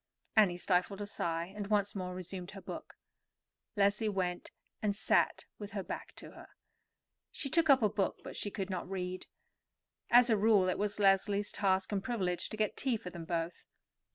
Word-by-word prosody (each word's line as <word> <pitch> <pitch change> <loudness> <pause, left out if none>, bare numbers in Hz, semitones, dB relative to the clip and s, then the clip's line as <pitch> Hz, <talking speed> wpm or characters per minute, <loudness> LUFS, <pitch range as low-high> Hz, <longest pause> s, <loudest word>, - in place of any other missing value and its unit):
Annie 200 -5 +5
stifled 185 +2 +1
a 205 - -3
sigh, 170 -2 -2
and 205 -1 -4
once 205 -1 +1
more 180 -2 -4
resumed 185 0 -6
her 195 -1 -9
book. - - -8 0.8
Leslie 205 +2 +2
went 180 -3 -2 0.3
and 205 -2 0
sat 210 - +2
with 205 -1 -7
her 195 -2 -3
back - - -7
to - - -11
her. - - -13 0.8
She 275 - -5
took 330 -2 +3
up 265 -4 +6
a - - +6
book, 200 -1 0
but - - -8
she 205 - -2
could 195 -1 -4
not 180 -1 -4
read. 185 -1 -4 0.8
As 245 0 +6
a 220 - +4
rule, 205 -3 +4
it - - -1
was 205 0 0
Leslie's 200 +1 +3
task 190 -1 +1
and 195 -2 -1
privilege 190 -8 -1
to 215 - -6
get 215 -1 0
tea 255 -4 +2
for 180 -4 -8
them 170 -2 -7
both. 165 0 -3
200 Hz, 185 wpm, -33 LUFS, 185-210 Hz, 0.8 s, up